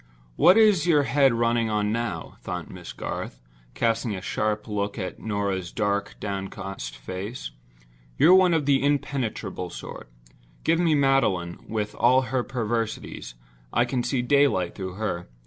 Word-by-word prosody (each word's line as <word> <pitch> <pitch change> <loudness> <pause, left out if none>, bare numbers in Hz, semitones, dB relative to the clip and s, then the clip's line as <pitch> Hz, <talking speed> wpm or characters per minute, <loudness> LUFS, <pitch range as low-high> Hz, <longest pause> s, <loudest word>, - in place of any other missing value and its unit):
"What 185 - +6
is 210 -7 +5
your 150 -4 +5
head 140 -1 +4
running 115 -1 +1
on 105 -1 0
now?" 115 +1 -3
thought - - -5
Miss - - -9
Garth, - - -5 0.4
casting 115 -1 0
a 95 - -6
sharp 105 0 -1
look 100 0 -2
at 95 -4 -5
Norah's 100 -4 -2
dark, 100 -2 -1
downcast 95 - -5
face. 95 - -6 0.7
"You're 180 - +7
one 185 -2 +6
of 155 -3 0
the 140 -1 +3
impenetrable 130 -10 -1
sort. 60 - -9 0.5
Give 165 +1 +2
me 165 -3 +3
Magdalen, 130 -12 +1
with 105 -1 -2
all 130 +2 +4
her 125 +1 -1
perversities; 115 - -3 0.4
I 120 - +3
can 125 0 -1
see 125 0 -1
daylight 135 -9 +3
through 95 -2 -6
her. 95 - -3
115 Hz, 145 wpm, -25 LUFS, 100-135 Hz, 0.7 s, You're